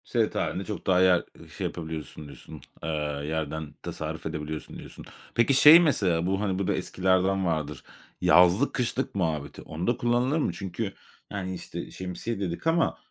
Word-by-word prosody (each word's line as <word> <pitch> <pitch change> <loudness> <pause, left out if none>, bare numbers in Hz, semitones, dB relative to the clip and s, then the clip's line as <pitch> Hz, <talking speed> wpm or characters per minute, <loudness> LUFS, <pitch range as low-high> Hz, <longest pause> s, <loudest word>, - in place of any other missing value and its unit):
Seyahat - - 0
hâlinde 95 - -1
çok 105 - -6
daha 90 -1 +4
yer, 90 -2 +4 0.2
ııı, - - -14
şey - - -3
yapabiliyorsun 80 -2 -7
diyorsun, 70 - -11 0.2
eee, 80 - -3 0.4
yerden 80 -1 -3
tasarruf 80 0 -5
edebiliyorsun 80 -1 -5
diyorsun. - - -11 0.3
Peki, 120 +4 +4
şey 150 +5 +10
mesela 95 - +2
bu, 95 +2 0
hani, 95 -3 -1
bu 100 - -1
da - - +2
eskilerden 95 +1 +1
vardır: 75 -4 -2 0.4
yazlık 90 +10 +5
kışlık 125 -4 -2
muhabbeti. 80 -6 -2
Onda 90 +10 -2
kullanılır 120 +5 +1
mı? - - 0
Çünkü, 95 +1 -4 0.4
yani, 95 -2 -4
işte, - - -7
"şemsiye" 95 +4 -5
dedik 90 - -3
ama 165 0 +2
95 Hz, 160 wpm, -27 LUFS, 80-105 Hz, 0.4 s, şey